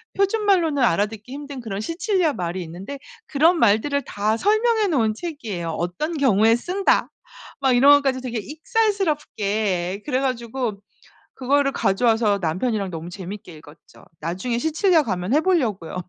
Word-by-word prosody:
표준말로는 390 -8 +2
알아듣기 210 +3 0
힘든 280 -2 -7
그런 205 -4 -5
시칠리아 340 - 0
말이 180 -3 -4
있는데 185 +12 -8 0.3
그런 320 +5 +3
말들을 235 +7 +2
다 215 -2 -1
설명해 435 - +2
놓은 230 -10 +1
책이에요. 220 - -5
어떤 180 - -3
경우에 225 -4 +4
쓴다 375 +9 +1 0.5
막 265 -2 +3
이런 280 +3 +7
것까지 275 -2 +2
되게 245 -3 -4
익살스럽게 290 - -1
그래 260 -3 0
가지고 240 -4 -3 0.5
그거를 275 +2 +1
가져와서 220 -1 +2
남편이랑 195 +5 -1
너무 165 0 -7
재밌게 190 -1 -8
읽었죠. 150 0 -17 0.2
나중에 185 +9 -3
시칠리아 320 - +2
가면 185 +1 -1
해 305 - +4
보려고요. 240 - 0
245 Hz, 355 characters per minute, -22 LUFS, 200-305 Hz, 0.5 s, 이런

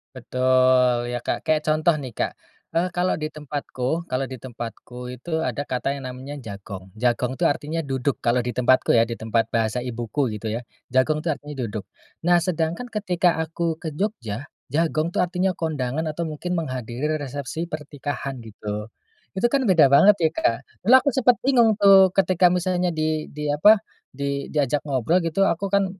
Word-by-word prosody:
Betul, 130 -1 +3
ya 120 - -3
Kak, - - -3
kayak 155 -1 +2
contoh 155 +2 +3
nih 130 - -6
Kak, - - -1 0.4
eee, 175 +2 +1
kalau 180 +1 0
di 155 0 -3
tempatku 150 +1 -4
kalau 130 +1 -1
di 130 -3 -9
tempatku 125 0 -8
itu 160 +6 -4
ada - - -2
kata 130 +2 -1
yang 135 -2 -6
namanya 130 +3 -8
"jagong." 100 -3 -8
"Jagong" 125 +2 0
itu - - +1
artinya 155 +2 -1
"duduk" 135 0 -1
kalau 120 +1 +1
di 120 - -4
tempatku 125 +1 +2
ya, 115 - +5
di 115 - -5
tempat 115 +1 0
bahasa 115 +2 0
ibuku 120 +1 -2
gitu 105 +1 -4
ya 115 +3 -2 0.3
"jagong" 135 +5 +2
itu 170 - -3
artinya 145 -1 -4
"duduk." 105 -4 -4 0.4
Nah 175 0 +5
sedangkan 170 +7 -2
ketika 180 -6 +1
aku 160 0 -2
ke 160 -2 -6
Jogja, 145 - -3 0.2
"jagong" 160 +1 +1
itu - - +2
artinya 180 +1 0
kondangan, 150 -4 -2
atau 165 +2 -3
mungkin 165 +3 -3
menghadiri 130 -4 -4 0.2
resepsi 145 +4 -5
pernikahan 145 -3 -5
gitu, 105 -1 -6 0.5
itu 200 - +1
kan 275 +3 +2
beda 155 -7 +5
banget 200 +9 +7
ya - - +4
Kak, 115 -7 +1 0.3
dulu - - +8
aku - - +4
sempet 250 -2 +4
bingung 235 -6 +4
tuh 195 -2 +7
ketika 185 -1 +4
misalnya 180 0 0
di 155 -1 -1
di 150 0 -6
apa 210 +9 +7 0.3
di 140 +1 -3
diajak 145 -1 0
ngobrol 140 +7 +2
gitu, 165 +4 +1
aku 195 +4 0
kan 200 0 +3
145 Hz, 175 wpm, -23 LUFS, 125-170 Hz, 0.5 s, dulu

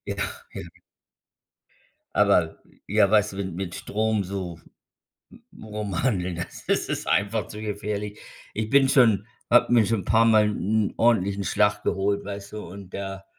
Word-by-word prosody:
Ach, - - -5
ja. - - -7 1.5
Aber, - - +3 0.3
ja, 105 0 +3
weißt 105 -1 +3
du, - - -8
mit 95 -2 -4
mit 90 -1 -5
Strom 110 0 -1
so, 90 -3 -5 0.9
mm, - - -14
rum 105 -4 -4
hanteln, 90 -8 0 0.3
das - - +1
ist - - -3
einfach 105 +1 0
zu 105 - -8
gefährlich. 105 0 -4 0.4
Ich 110 0 -3
bin 140 -1 +5
schon 115 -7 +4 0.2
habe 120 0 +5
mir 120 -2 +6
schon 115 -1 0
'n - - -9
paarmal 110 0 +4
'n 105 +1 0
ordentlichen 100 -4 +2
Schlag 105 +2 +1
geholt, 100 +1 0
weißt 100 0 -7
du, 105 - -6
und 95 +1 -10
da, 95 0 -5
105 Hz, 150 wpm, -25 LUFS, 95-110 Hz, 1.5 s, mir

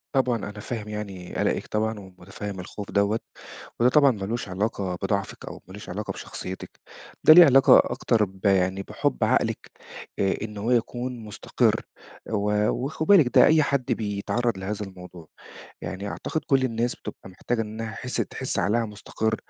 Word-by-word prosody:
طبعًا 125 -3 +2
أنا 105 0 -7
فاهم 105 0 -5
يعني 100 -4 -6
قَلَقِك - - 0
طبعًا 110 0 -1
ومُتفهِّم 95 +1 -8
الخوف 100 +3 -8
دوّة 100 +2 +2 0.6
وده 120 +1 +5
طبعًا 140 0 +5
مالوش 105 0 -4
علاقة 95 -1 -2
بضعفِك 100 0 -2
أو - - -9
مالوش 100 +2 -10
علاقة 105 +4 -4
بشخصيتِك، 95 0 -8 0.4
ده 155 - +10
ليه 175 0 +10
علاقة 135 -2 +7
أكتر 120 -3 +1
ب 95 +1 -14
يعني 95 0 +2
بِحُب 60 - -1
عقلِك، - - 0 0.5
آآ 95 -1 +2
إن 105 -1 -6
هو 110 +4 -1
يكون 120 +1 -1
مُستقر 105 -2 0 0.5
و 105 0 +1
وخدي 155 +4 -2
بالِك 140 -6 +2
ده 125 - +9
أي 155 0 +5
حد 140 -3 0
بيتعرّض 110 +2 -1
لهذا 100 +2 -4
الموضوع، 90 -3 -12 0.5
يعني 100 +2 -5
أعتقد 155 +9 -3
كل 135 -4 +3
الناس 120 0 -1
بتبقى - - -9
محتاجة 115 +5 -2
إنّها 110 +1 -5
حِس 125 +3 -6
تحس 130 - -3
عقلها 105 +5 +1
مُستقر، 110 +1 -2
105 Hz, 155 wpm, -25 LUFS, 100-120 Hz, 0.6 s, ده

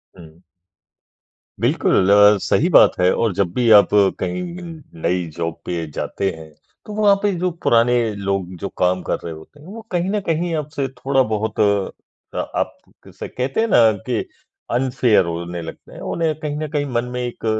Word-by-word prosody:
हुँ। 85 -2 -15 1.2
बिल्कुल 95 - +2
अ, 105 0 +7
सही - - +2
बात - - +7
है। 90 0 +4
और 115 -4 0
जब 90 -1 0
भी 120 +1 +1
आप 100 - +4 0.3
कहीं 180 - -2 0.6
नई 90 +1 0
जॉब 85 -1 -2
पे 85 -2 -3
जाते 95 +6 -2
हैं, 80 -1 -11 0.4
तो 210 - -8
वहाँ 205 -1 +4
पे 205 - +2
जो 180 +1 +1
पुराने 120 +1 +4 0.2
लोग 100 -2 -3
जो 100 - -2
काम 90 0 +1
कर - - -1
रहे 85 - -5
होते 80 - -14
हैं 150 - -15
वो 220 +4 -9
कहीं 175 +1 0
न 210 +1 0
कहीं 165 +1 0
आपसे 145 -3 -3
थोड़ा-बहुत 125 -5 -1
अ, 100 -2 -2
आप - - -3 0.3
जैसे - - -8
कहते 130 +6 -3
हैं 230 - +1
ना 115 - +5 0.2
कि 120 -3 0 0.5
अनफ़ेयर 120 -4 +2
होने 85 +1 -4
लगते 80 - -10
हैं। - - -10
उन्हें 165 -2 0
कहीं 150 -2 -4
न 155 0 -3
कहीं 145 -2 -1
मन 120 0 0
में 125 - -2
एक 120 -1 -6
115 Hz, 175 wpm, -20 LUFS, 90-150 Hz, 1.2 s, अ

